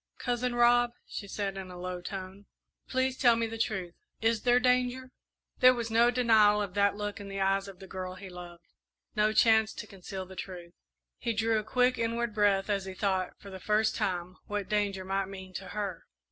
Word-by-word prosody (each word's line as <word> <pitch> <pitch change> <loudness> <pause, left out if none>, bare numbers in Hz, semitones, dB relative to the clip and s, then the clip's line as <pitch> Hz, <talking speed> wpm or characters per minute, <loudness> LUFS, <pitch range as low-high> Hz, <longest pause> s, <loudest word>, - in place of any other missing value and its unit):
"Cousin 245 0 -1
Rob," 240 0 +4
she 200 - -7
said, 195 -1 -3
in 190 -1 -6
a 180 - -9
low 180 0 -5
tone, 190 +1 -7 0.4
"please 260 0 +1
tell 240 -2 +6
me 230 0 0
the 225 0 -5
truth 190 -6 -2 0.3
is 225 -1 +1
there 245 0 +4
danger?" 250 +1 +1 0.5
There 255 -1 +7
was 230 -2 -3
no 235 +2 +5
denial 220 -4 +4
of 200 -3 -3
that 200 0 +3
look 205 +1 -4
in 200 - -8
the 195 0 -5
eyes 195 +1 +1
of 195 -2 -10
the 190 - -11
girl 185 -1 -6
he 190 +1 -9
loved, 175 -1 -11 0.5
no 215 0 +3
chance 220 0 +4
to - - -6
conceal 190 -1 -7
the 190 +1 -12
truth. 175 -2 -8 0.5
He 235 -2 -1
drew 225 0 +1
a - - -5
quick 250 +3 +2
inward 230 0 -1
breath 205 -2 +2
as 200 -2 -1
he 190 -1 -7
thought, 190 -2 0
for 200 - -11
the 190 - -8
first 215 +3 +1
time, 180 -1 -2
what 205 -2 -3
danger 200 -3 0
might 195 0 -1
mean 190 -1 -9
to 190 +1 -6
her. 200 -5 -5
205 Hz, 205 wpm, -30 LUFS, 190-230 Hz, 0.5 s, There